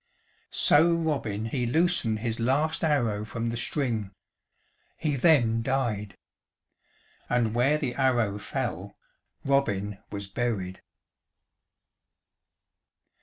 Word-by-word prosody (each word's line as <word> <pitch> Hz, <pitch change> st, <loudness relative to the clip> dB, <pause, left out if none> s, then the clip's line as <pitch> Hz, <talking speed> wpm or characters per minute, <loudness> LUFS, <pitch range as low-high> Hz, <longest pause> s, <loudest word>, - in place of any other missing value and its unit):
So 170 Hz, +3 st, +4 dB
Robin 140 Hz, -11 st, -1 dB
he 120 Hz, +1 st, -1 dB
loosened 130 Hz, -7 st, +1 dB
his 115 Hz, -1 st, -2 dB
last 140 Hz, +8 st, +1 dB
arrow 120 Hz, -10 st, +1 dB
from 115 Hz, +1 st, -3 dB
the -, -, -3 dB
string. 120 Hz, -4 st, -1 dB, 0.9 s
He 150 Hz, -3 st, -1 dB
then 120 Hz, -6 st, +4 dB
died. 115 Hz, -6 st, -2 dB, 1.1 s
And 120 Hz, -3 st, +1 dB
where 130 Hz, +6 st, +3 dB
the 125 Hz, -5 st, -2 dB
arrow 120 Hz, -6 st, +1 dB
fell 105 Hz, -5 st, -4 dB, 0.5 s
Robin 105 Hz, -8 st, 0 dB
was 100 Hz, -1 st, -5 dB
buried. 100 Hz, -3 st, -3 dB
120 Hz, 95 wpm, -27 LUFS, 105-140 Hz, 1.1 s, So